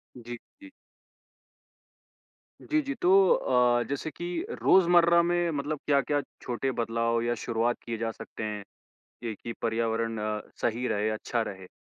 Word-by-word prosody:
जी, 120 -1 -7 0.2
जी। 290 - -12 1.9
जी, 310 0 +1
जी, 280 -1 -3
तो 190 +1 +6
अ, 125 -1 +3
जैसे 140 +3 -3
कि 175 +4 -6 0.3
रोज़मर्रा 170 -2 +6
में 175 0 +1
मतलब 145 +1 -2
क्या-क्या 145 0 +2 0.2
छोटे 125 +2 -2
बदलाव 115 0 0
या 120 0 0
शुरुआत 120 +1 0
किए 115 -1 -4
जा 115 0 -2
सकते 110 - -8
हैं? 105 -1 -4 0.6
ये 115 -2 -2
कि 115 +3 -7
पर्यावरण 115 0 0 0.5
सही 120 +2 0
रहे, 105 +1 0
अच्छा 115 +2 -1
रहे? 95 -1 -9
120 Hz, 135 wpm, -28 LUFS, 115-165 Hz, 1.9 s, तो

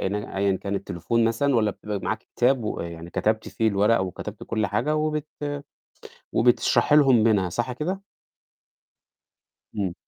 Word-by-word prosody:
أيًا 100 -1 -1
كان 100 +1 -4
التليفون 115 +5 -1
مثلًا، 125 +5 +1
والّا 110 -2 +2
بتبقى 105 0 -5
معاكِ 110 +4 -4
كتاب 125 -1 +3
ويعني 85 -4 -5
كتبتِ 110 0 0
فيه 110 -1 +1
الورق 105 +2 +3
وكتبتِ 95 -2 -5
كلّ 110 -2 -1
حاجة 150 +10 0
وبت 155 0 -1 1.1
وبتشرحي 125 +5 +3
لهم 135 -7 +6
منها 100 -5 +3
صح 120 +7 -2
كده؟ 180 +9 -3 1.8
امم. 95 -4 -1
110 Hz, 130 wpm, -25 LUFS, 100-125 Hz, 1.8 s, لهم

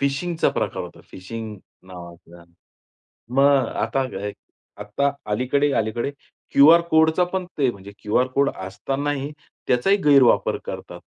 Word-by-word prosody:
फिशिंगचा 150 +5 0
प्रकार - - -3
होता. - - -11
फिशिंग 110 +3 -7 0.3
नावाचा. 85 -1 -12 0.9
मग 140 -2 +4 0.2
आता 130 +4 0 0.8
आत्ता 105 +8 0 0.2
अलीकडे 140 +6 +1
अलीकडे 110 +5 -2 0.4
क्यूआर 160 +5 +7
कोडचा 160 +3 +4
पण 185 +1 -3
ते, 135 -3 +3
म्हणजे 100 -2 -12
क्यूआर 110 +4 +1
कोड 140 0 +3
असतानाही 135 +9 -3 0.4
त्याचाही 160 +12 +3
गैरवापर 140 -4 +4
करतात. - - -7
135 Hz, 115 wpm, -22 LUFS, 105-145 Hz, 0.9 s, क्यूआर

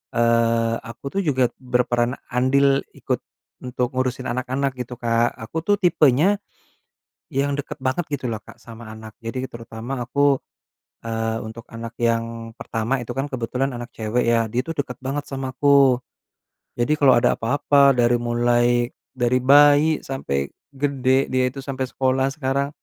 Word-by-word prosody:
eee, 115 0 +2
aku 115 +4 -11
tuh - - +2
juga 130 -4 +2
berperan 125 0 0 0.2
andil 135 +2 +3
ikut - - -2 0.4
untuk 125 0 -2
ngurusin 130 0 -1
anak-anak 130 +2 -1
gitu 125 0 -5
Kak. 115 0 +1
Aku 130 +7 -5
tuh 205 - +4
tipenya 170 +3 +4 0.9
yang 140 +1 +1
deket 140 - -5
banget 130 +6 -1
gitu 130 -3 -2
lah 110 - -2
Kak - - -14
sama 115 -1 -11
anak. 110 -1 -11
Jadi 130 +3 -3
terutama 115 +2 -6
aku, 140 +2 +2 0.7
eee, 115 0 -1
untuk 115 +1 -9
anak 115 0 -7
yang 115 0 -1
pertama 115 +4 -1
itu 120 - -7
kan 135 +2 -1
kebetulan 130 +2 -2
anak 120 0 -8
cewek 110 +2 0
ya, 115 -1 +3
dia 125 +1 +1
tuh 165 -1 -5
deket 125 -3 -9
banget 140 +2 -3
sama 135 -1 -4
aku. 140 -3 +5 0.8
Jadi 130 +6 +2
kalo 130 -3 +6
ada - - +3
apa-apa, 140 +3 +4
dari 120 0 +3
mulai, 120 0 +2 0.3
dari 120 +1 +2
bayi 145 +3 +5
sampe 70 - -3 0.2
gede, 135 -1 +1
dia 130 0 +2
itu 135 +1 -8
sampe 135 -1 -3
sekolah 130 0 +1
sekarang, 140 -1 -1
125 Hz, 150 wpm, -22 LUFS, 115-135 Hz, 0.9 s, kalo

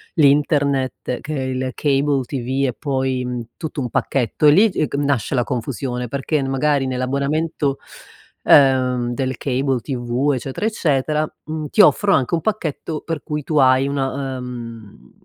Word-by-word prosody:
l'Internet 140 -4 +1
che 155 - -5
il 130 -2 -2
cable 140 -1 +1
TV 130 +1 -2
e 125 - -1
poi, 130 -3 -1
uhm, 125 -1 -4
tutto 160 -2 -5
un 125 -3 -2
pacchetto 130 +4 0
e - - +8
lì 205 +9 +5
è 155 -5 0
c - - -4
nasce 140 -2 0
la 120 -2 +1
confusione 125 -1 -3
perché 140 +3 -1
magari 135 +1 +1
nell'abbonamento, 140 +3 -1 0.7
ehm, 125 -3 +4
del 130 -1 -2
cable 135 -1 0
TV, 125 +2 -1
eccetera, 130 - -4
eccetera, 155 -6 0
mhmm, 155 -1 -4
ti 210 - +5
offrono 205 -1 +5
anche 130 +2 -2
un 165 - -2
pacchetto 165 -6 -3
per 165 -3 -5
cui 150 -1 -4
tu 155 - -2
hai 130 0 +4
una 135 -1 -2
ehm, 115 - -9
135 Hz, 155 wpm, -20 LUFS, 130-150 Hz, 0.7 s, e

